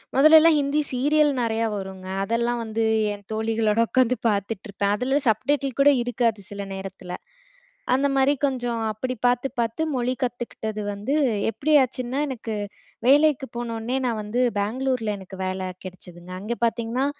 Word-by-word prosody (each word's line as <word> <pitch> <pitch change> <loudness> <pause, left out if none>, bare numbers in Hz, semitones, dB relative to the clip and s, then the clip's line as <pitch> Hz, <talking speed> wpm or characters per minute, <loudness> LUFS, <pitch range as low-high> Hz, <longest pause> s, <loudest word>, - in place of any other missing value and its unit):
முதலெல்லா 310 +4 +8
Hindi 285 +2 +1
serial 295 +3 +3
நெறையா 225 0 0
வருங்க. 190 -1 -7 0.2
அதெல்லா 235 +3 0
வந்து 225 0 -2 0.3
என் 205 0 -10
தோழிகளோட 220 0 0
உக்காந்து 255 -1 +3
பார்த்துட்டு 200 0 -2
இருப்ப 200 0 -6
அதுல 265 +6 +1
சப்டைட்டில் 275 +4 0
கூட 285 +1 +7
இருக்காது 230 -3 0
சில 200 0 -6
நேரத்துல. 190 -2 -7 0.8
அந்த 275 +2 +2
மாரி 270 +2 +4
கொஞ்சம் 245 -4 -2
அப்படி 255 +4 -3
பாத்து, 245 +1 +2
பாத்து 230 +6 -1
மொழி 250 0 0
கத்துக்கிட்டது 240 -3 -3
வந்து 210 +8 -2 0.4
எப்படி 270 +8 -1
ஆச்சுன்னா, 255 +1 -3
எனக்கு 230 -4 -5 0.5
வேலைக்கு 290 0 +4
போனோனே 235 +1 -3
நான் 225 -3 -1
வந்து 210 +4 -2 0.2
பெங்களூரில 225 +1 -1
எனக்கு 190 0 -11
வேலை 185 0 -3 0.2
கிடைச்சதுங்க. 180 -1 -10
அங்க 225 +4 -3
பாத்தீங்ன்னா 235 +3 0
235 Hz, 140 wpm, -24 LUFS, 210-260 Hz, 0.8 s, முதலெல்லா